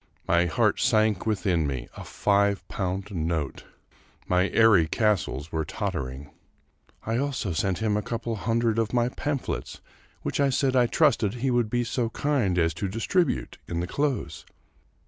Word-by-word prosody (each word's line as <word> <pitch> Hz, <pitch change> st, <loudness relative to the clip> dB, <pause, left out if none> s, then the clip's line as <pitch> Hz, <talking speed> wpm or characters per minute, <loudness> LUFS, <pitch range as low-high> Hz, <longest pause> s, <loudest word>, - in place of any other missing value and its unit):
My 85 Hz, 0 st, +3 dB
heart 105 Hz, +5 st, +1 dB
sank 110 Hz, -5 st, +2 dB
within 95 Hz, -7 st, +1 dB
me 65 Hz, -4 st, -4 dB
I -, -, -8 dB
A -, -, -9 dB
iive 100 Hz, -1 st, +1 dB
pound 95 Hz, +1 st, -3 dB
note! 80 Hz, -4 st, -2 dB, 0.6 s
My 90 Hz, +2 st, +2 dB
airy 105 Hz, -8 st, +5 dB
castles 95 Hz, -, 0 dB
were 80 Hz, -1 st, -1 dB
tottering! 70 Hz, -1 st, -4 dB, 0.4 s
" -, -, -32 dB
I 115 Hz, +1 st, 0 dB
also 130 Hz, -8 st, -1 dB
sent 95 Hz, +5 st, -1 dB
him 105 Hz, -2 st, +1 dB
a 105 Hz, -, +1 dB
couple 115 Hz, +1 st, -3 dB
of 110 Hz, -, -5 dB
hundred 115 Hz, +1 st, +1 dB
of 110 Hz, 0 st, -1 dB
my 120 Hz, 0 st, +2 dB
pamphlets, 140 Hz, +1 st, -4 dB, 0.4 s
which -, -, -2 dB
I 140 Hz, -1 st, +4 dB
said 130 Hz, 0 st, +1 dB
I 125 Hz, -1 st, +4 dB
trusted 110 Hz, -1 st, +2 dB
he 130 Hz, +2 st, -1 dB
would 120 Hz, -3 st, +1 dB
be 120 Hz, +2 st, 0 dB
so 115 Hz, 0 st, -1 dB
kind 120 Hz, -10 st, 0 dB
as 80 Hz, -1 st, +2 dB
to 100 Hz, -, 0 dB
distribute 115 Hz, -, -1 dB
in 85 Hz, -, -3 dB
the 85 Hz, -, -1 dB
close." 135 Hz, +4 st, -2 dB
105 Hz, 170 wpm, -26 LUFS, 90-120 Hz, 0.6 s, airy